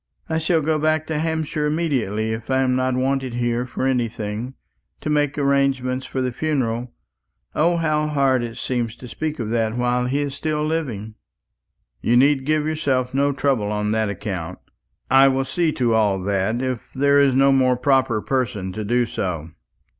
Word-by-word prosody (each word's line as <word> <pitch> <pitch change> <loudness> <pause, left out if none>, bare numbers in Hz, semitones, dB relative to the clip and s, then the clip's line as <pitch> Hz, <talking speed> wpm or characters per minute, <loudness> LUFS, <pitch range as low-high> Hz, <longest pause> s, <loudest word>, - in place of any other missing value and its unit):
"I 160 0 0
shall 160 0 +2
go 155 +1 0
back 155 0 +1
to 160 -1 -2
Hampshire 160 -1 -1
immediately; 125 - -1
if 110 +2 -7
I 130 0 +2
am 130 -1 +1
not 130 0 +1
wanted 130 -1 -1
here 120 0 -1
for 130 - -3
anything 115 -1 -2 0.4
to 155 - -3
make 145 -1 +1
arrangements 135 -2 +1
for 130 - -2
the 125 - -1
funeral. 125 -4 -1 0.6
O, 170 +3 +2
how 155 -2 +1
hard 135 -4 +2
it 115 -1 -5
seems 120 -3 -2
to 125 - -11
speak 155 +6 -4
of 115 -3 -4
that 115 0 0
while 125 0 +1
he 140 +3 0
is 140 -1 -4
still 150 +1 -2
living!" 125 -10 -3 0.9
"You 120 +2 +3
need 135 +1 +3
give 155 -1 +2
yourself 135 -5 0
no 140 +1 +2
trouble 130 -6 0
on 105 0 -1
that 110 -1 +1
account. 95 -4 -5 0.5
I 135 +1 +7
will 135 0 +1
see 165 +3 0
to 120 -3 +1
all 105 -3 +2
that, 100 +5 0
if 130 -3 -4
there 140 +1 +4
is 135 -2 +3
no 135 +1 +5
more 130 -2 +3
proper 130 -4 +2
person 105 -8 -1
to 110 +3 -5
do 120 +3 +1
so." 85 -7 -4
130 Hz, 180 wpm, -22 LUFS, 115-145 Hz, 0.9 s, I